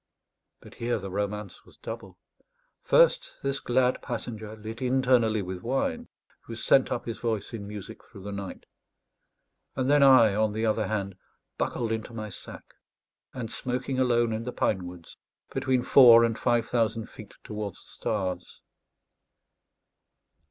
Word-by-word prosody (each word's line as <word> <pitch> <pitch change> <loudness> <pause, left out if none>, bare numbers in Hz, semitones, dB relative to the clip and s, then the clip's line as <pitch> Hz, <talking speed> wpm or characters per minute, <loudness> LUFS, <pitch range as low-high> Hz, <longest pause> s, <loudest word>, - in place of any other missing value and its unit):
But - - -14
here 120 0 -1
the 95 -2 -7
romance 105 +1 -4
was - - -19
double: - - -8 0.6
first, - - +3
this 140 0 -1
glad 125 +1 +1
passenger, 110 -3 -5
lit 110 +3 -8
internally 125 -4 +2
with 90 0 -6
wine, 240 - -1 0.4
who 115 - -7
sent 130 +3 +3
up 120 - -2
his 115 -2 -5
voice 110 -3 -2
in 100 -3 -6
music 105 -2 -9
through 95 - -14
the 100 - -6
night; 100 -2 -7 1.1
and 130 +1 +1
then 145 0 +5
I, 130 -6 +7
on 110 0 +1
the 110 +1 -1
other 110 -2 +1
hand, 100 -3 -3 0.4
buckled 115 -2 -1
into 110 +1 -4
my 110 -1 -5
sack, - - -10 0.7
and 120 -3 -6
smoking 130 +1 -3
alone 120 -3 +2
in 110 +1 -3
the 125 - -4
pine 95 -7 0
woods 90 -2 -12 0.4
between 130 -2 +1
four 120 -3 +8
and 115 -1 +1
five 120 -1 +1
thousand 115 -2 0
feet 105 -2 -13
towards 105 -2 -6
the - - -16
stars. 95 -4 -3
115 Hz, 150 wpm, -27 LUFS, 105-125 Hz, 1.1 s, four